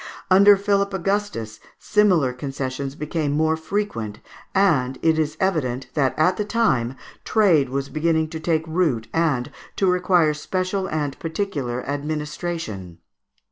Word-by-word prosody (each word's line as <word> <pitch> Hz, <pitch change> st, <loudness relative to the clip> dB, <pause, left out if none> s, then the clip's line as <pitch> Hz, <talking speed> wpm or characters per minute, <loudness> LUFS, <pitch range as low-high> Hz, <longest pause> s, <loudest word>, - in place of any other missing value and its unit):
Under 200 Hz, +2 st, +7 dB
Philip 200 Hz, 0 st, +1 dB
Augustus 190 Hz, -, -2 dB, 0.2 s
similar 180 Hz, -11 st, +2 dB
concessions 135 Hz, +1 st, -4 dB
became 150 Hz, -1 st, -2 dB
more 160 Hz, +1 st, +2 dB
frequent, 160 Hz, -, -3 dB, 0.4 s
and 145 Hz, -10 st, +2 dB
it 160 Hz, -1 st, +3 dB
is 155 Hz, 0 st, -1 dB
evident 135 Hz, -9 st, -1 dB
that 135 Hz, -4 st, +1 dB
at 180 Hz, +4 st, +3 dB
that 210 Hz, -1 st, -3 dB
time 135 Hz, -, +1 dB, 0.3 s
trade 175 Hz, -, +3 dB
was 135 Hz, +1 st, -2 dB
beginning 160 Hz, +1 st, 0 dB
to 160 Hz, 0 st, -6 dB
take 160 Hz, 0 st, 0 dB
root 155 Hz, -9 st, 0 dB
and 150 Hz, -6 st, 0 dB, 0.2 s
to 195 Hz, -, +1 dB
require 180 Hz, -3 st, +3 dB
special 185 Hz, +5 st, -2 dB
and 150 Hz, -4 st, -3 dB
particular 150 Hz, -8 st, -3 dB
administration. 145 Hz, -, -4 dB
155 Hz, 130 wpm, -22 LUFS, 135-185 Hz, 0.4 s, Under